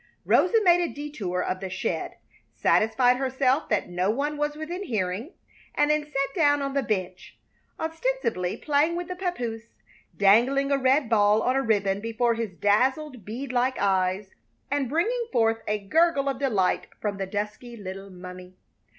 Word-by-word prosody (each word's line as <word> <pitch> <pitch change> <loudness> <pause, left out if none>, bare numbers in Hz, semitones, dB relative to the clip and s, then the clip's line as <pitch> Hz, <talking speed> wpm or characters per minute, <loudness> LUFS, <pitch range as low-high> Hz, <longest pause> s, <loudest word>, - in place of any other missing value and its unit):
Rosa 365 +6 +4
made 350 -2 +5
a 345 - -1
detour 280 -12 -4
of 185 - -2
the 190 - -5
shed, 185 - -3 0.4
satisfied 245 +3 +3
herself 265 +2 0
that 210 -3 0
no 180 +2 -1
one 285 +7 -1
was 295 0 -2
within 325 +5 -5
hearing, 215 - -2 0.4
and 295 0 +3
then 300 0 +1
sat 275 -2 -2
down 290 -4 +3
on 275 0 -3
the 275 - +1
bench, 185 -6 -4 0.4
ostensibly 320 - -2
playing 300 +3 +1
with 350 0 -4
the 365 - -4
papoose, 240 -12 -4 0.4
dangling 245 +8 +4
a 280 - +3
red 265 +1 +3
ball 210 -1 +3
on 255 - +1
a 270 - +2
ribbon 200 -5 +1
before 230 +1 0
his 230 -1 -3
dazzled, 255 - +1
bead 245 +5 -5
like 255 +1 +1
eyes 190 0 0 0.4
and 280 -3 0
bringing 460 - 0
forth 225 -1 +2
a 210 - +1
gurgle 280 +8 +2
of 275 - -1
delight 210 -10 +1
from 205 -2 -3
the 195 -1 -3
dusky 210 +4 -5
little 195 -1 -8
mummy. 180 0 -11
245 Hz, 165 wpm, -26 LUFS, 205-290 Hz, 0.4 s, made